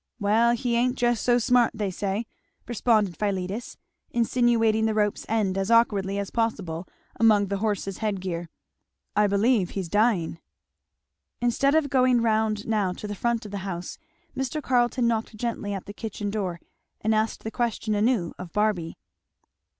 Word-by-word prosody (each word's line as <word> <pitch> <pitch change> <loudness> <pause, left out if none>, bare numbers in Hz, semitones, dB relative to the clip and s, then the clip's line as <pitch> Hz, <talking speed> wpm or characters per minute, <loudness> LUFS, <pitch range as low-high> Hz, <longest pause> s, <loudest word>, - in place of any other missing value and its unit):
"Well 225 +3 +3
he 240 -1 -1
ain't 250 +2 +1
just 240 -2 +1
so 245 -1 +4
smart, 245 0 +3
they 205 -3 -2
say," 200 +4 -2 0.4
responded 215 -5 +2
Philetus, 200 +2 -3 0.3
insinuating 230 -2 +2
the 220 - 0
rope's 210 -1 0
end 205 -4 +1
as 195 +2 -1
awkwardly 205 -4 +3
as 200 -1 -3
possible 190 -7 -2 0.3
among 210 -3 +4
the 200 - -1
horse's 200 -2 -2
head 210 -3 -1
gear, 175 -2 -4 0.7
"I 210 0 +4
believe 200 -1 +2
he's 190 -4 -4
dying." 205 -6 +1 1.0
Instead 260 +4 +2
of 300 -4 +2
going 255 -2 +4
round 220 -2 +1
now 210 -5 0
to 210 - -8
the 205 - -4
front 235 +2 -1
of 205 - -8
the 200 - -4
house, 180 -2 -6 0.4
Mr. 265 +3 -2
Carleton 245 -3 +1
knocked 225 -1 -1
gently 220 -3 -3
at 195 -2 -4
the 205 - -8
kitchen 205 -1 -4
door 190 -5 -3 0.4
and 220 +1 +1
asked 215 +1 0
the 220 - -4
question 230 -2 -1
anew 210 -4 +1
of 180 -2 -7
Barby. 210 -5 0
215 Hz, 160 wpm, -26 LUFS, 195-235 Hz, 1.0 s, so